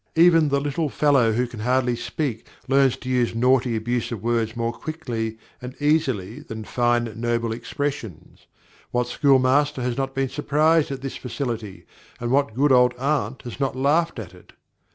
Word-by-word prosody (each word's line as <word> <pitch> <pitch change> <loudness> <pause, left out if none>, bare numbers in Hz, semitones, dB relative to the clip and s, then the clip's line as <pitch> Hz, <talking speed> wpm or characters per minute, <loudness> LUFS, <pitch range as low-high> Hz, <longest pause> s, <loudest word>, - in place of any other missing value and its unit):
Even 165 -2 +5
the 140 0 +2
little 145 +2 -2
fellow 135 -6 +3
who 120 +3 +1
can 120 -2 -9
hardly 125 +2 +1
speak 120 -2 -4 0.2
learns 135 -1 +3
to - - -11
use 125 -2 +1
naughty, 125 0 +2
abusive 115 -1 -2
words 115 -1 0
more 115 0 -1
quickly 115 -8 -4 0.2
and 125 +1 -9
easily 135 -8 0
than 110 -7 -8
fine, 120 0 0
noble 115 -1 0
expressions. 120 - -5 0.4
What 125 0 0
school 135 +2 +3
master 135 +1 +2
has 125 -1 -2
not 135 0 -2
been 135 -1 0
surprised 150 +3 +2
at 135 -1 -6
this 135 - -5
facility, 115 -6 -5 0.3
and 120 0 -3
what 140 -4 +1
good 140 +3 +3
old 125 -1 +5
aunt 130 -3 -1
has 120 +1 -8
not 135 -2 -1
laughed 150 +5 +1
at 100 -5 -7
it? 90 - -18
125 Hz, 170 wpm, -23 LUFS, 115-140 Hz, 0.4 s, Even